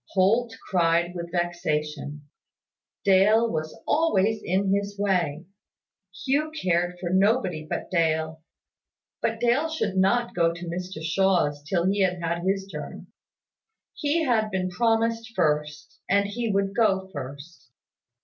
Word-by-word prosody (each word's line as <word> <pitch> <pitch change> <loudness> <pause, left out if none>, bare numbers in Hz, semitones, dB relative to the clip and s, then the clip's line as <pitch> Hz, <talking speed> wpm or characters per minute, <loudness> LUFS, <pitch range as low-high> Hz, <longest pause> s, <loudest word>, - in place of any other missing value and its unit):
Holt 225 +5 +2
cried 170 -1 +2
with 170 -1 -6
vexation. 155 -4 -2 0.8
Dale 205 +4 +5
was 155 -5 -4
always 220 -10 +2
in 190 +2 +1
his 200 0 -2
way. 180 -6 0 0.8
Hugh 290 +3 +1
cared 175 - 0
for 175 -1 -3
nobody 190 -5 +1
but - - -4
Dale; 160 -2 0 0.8
but 225 0 -1
Dale 245 +7 +2
should 210 -12 -2
not 235 +6 +2
go 170 -1 +2
to 175 +1 -7
Mr 175 -1 -5
Shaw's 165 -4 +1
till 170 +4 -1
he 195 +2 +1
had 180 -2 +1
had 170 0 -2
his 195 +1 0
turn. 150 -6 -8 0.8
He 310 +2 0
had 225 -6 +1
been 185 -2 -2
promised 230 +2 0
first, 150 -3 -1
and 200 +1 +3
he 230 +3 -3
would 195 0 0
go 195 -4 +2
first. 145 +1 -9
185 Hz, 130 wpm, -25 LUFS, 165-215 Hz, 0.8 s, Dale